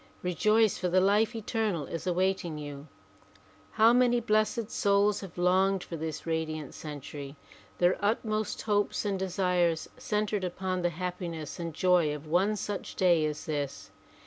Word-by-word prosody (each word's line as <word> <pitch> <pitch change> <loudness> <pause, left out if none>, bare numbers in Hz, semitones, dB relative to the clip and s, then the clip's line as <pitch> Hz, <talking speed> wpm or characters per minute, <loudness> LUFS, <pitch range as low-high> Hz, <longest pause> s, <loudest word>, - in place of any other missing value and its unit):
Rejoice, 215 +4 +2
for 180 - 0
the 185 +2 +4
life 210 +5 +3
eternal 215 - -1
is 165 +6 -6
awaiting 180 -2 0
you. 145 0 -8 0.9
How 225 +2 +6
many 245 -1 +4
blessed 215 0 0
souls 200 0 +2
have 190 -4 -10
longed 185 +2 +2
for 170 - -7
this 160 -1 -5
radiant 155 -3 -3
century 145 -1 -8 0.4
their 180 +1 +3
utmost 215 0 -1
hopes 205 0 0
and 195 -2 -1
desires 180 -3 +1
centered 210 -4 -1
upon 185 0 -2
the 175 - +2
happiness 170 -3 -5
and 170 -1 -3
joy 170 -2 +2
of 150 +1 -9
one 185 +7 +2
such 205 -1 -5
day 175 -4 +4
as 150 0 -5
this. 145 -3 -4
185 Hz, 145 wpm, -29 LUFS, 160-210 Hz, 0.9 s, How